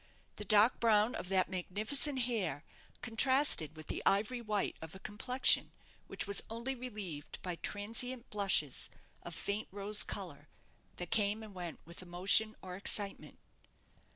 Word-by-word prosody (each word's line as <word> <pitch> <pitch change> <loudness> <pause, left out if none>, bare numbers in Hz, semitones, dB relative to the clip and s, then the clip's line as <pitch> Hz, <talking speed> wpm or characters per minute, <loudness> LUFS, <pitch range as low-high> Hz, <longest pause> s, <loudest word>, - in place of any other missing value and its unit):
The 210 - -5
dark 215 +4 +5
brown 220 0 +2
of 180 - -5
that 190 -2 +2
magnificent 215 - 0
hair 190 - -2 0.4
contrasted 245 - +4
with 155 0 -11
the - - -5
ivory 215 +5 +1
white 210 -3 -2
of 160 +2 -9
a - - -10
complexion 250 +6 +1 0.3
which - - -4
was 200 0 +3
only 235 +4 -4
relieved 205 - -7
by 180 -2 -4
transient 230 +6 -2
blushes 195 -9 +2 0.3
of - - -9
faint 205 +2 -3
rose 205 +2 +2
colour, - - -6 0.5
that - - -7
came 210 0 +1
and 215 -2 -11
went 175 -3 -8
with 170 +2 -9
emotion 190 +5 +3
or 180 -1 -7
excitement. 200 +1 -2
205 Hz, 145 wpm, -33 LUFS, 185-230 Hz, 0.5 s, dark